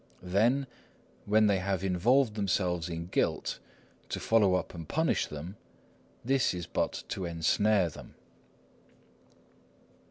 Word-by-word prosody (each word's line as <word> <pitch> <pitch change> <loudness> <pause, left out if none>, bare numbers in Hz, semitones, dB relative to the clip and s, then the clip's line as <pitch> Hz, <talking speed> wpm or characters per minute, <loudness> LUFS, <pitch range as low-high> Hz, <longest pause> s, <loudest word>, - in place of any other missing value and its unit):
Then, 115 +10 +2 0.6
when 110 +1 +4
they 100 -2 +3
have 95 0 -2
involved 110 +7 +2
themselves 90 -4 -1
in 85 0 -4
guilt, 90 - -1 0.5
to - - -3
follow 105 -5 +3
up 90 - -3
and 85 -2 -8
punish 160 +2 +1
them,—this 95 - -4
is 90 -1 -5
but - - -2
to 95 - -3
ensnare 90 +4 +2
them." 80 - -11
95 Hz, 115 wpm, -30 LUFS, 90-110 Hz, 0.6 s, when